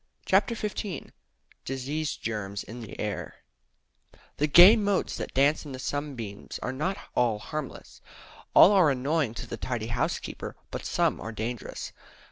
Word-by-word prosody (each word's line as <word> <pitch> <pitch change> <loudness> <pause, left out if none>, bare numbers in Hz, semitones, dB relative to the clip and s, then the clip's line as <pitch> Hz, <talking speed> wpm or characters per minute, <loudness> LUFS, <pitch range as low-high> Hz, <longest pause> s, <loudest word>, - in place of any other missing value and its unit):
CHAPTER 200 +4 +3
XV 205 -6 -4 0.5
DISEASE 140 +4 -3
GERMS 100 -3 -4
IN 120 +2 -9
THE 110 - -9
AIR 105 -1 -4 1.0
The 150 - +2
gay 175 +8 +9
motes 205 -3 0
that - - -6
dance 140 +3 +3
in 145 -3 -8
the - - -5
sunbeams 130 -6 -5
are 125 - -2
not 180 +9 -1 0.2
all 115 -3 +2
harmless. 150 +6 -7 0.5
All 195 - +9
are 185 -6 +5
annoying 135 -1 0
to 120 - -5
the - - -6
tidy 120 -3 -3
housekeeper; 120 - -3 0.2
but - - -5
some - - +1
are 115 - -5
dangerous. 115 +2 -5
135 Hz, 145 wpm, -28 LUFS, 115-160 Hz, 1.0 s, gay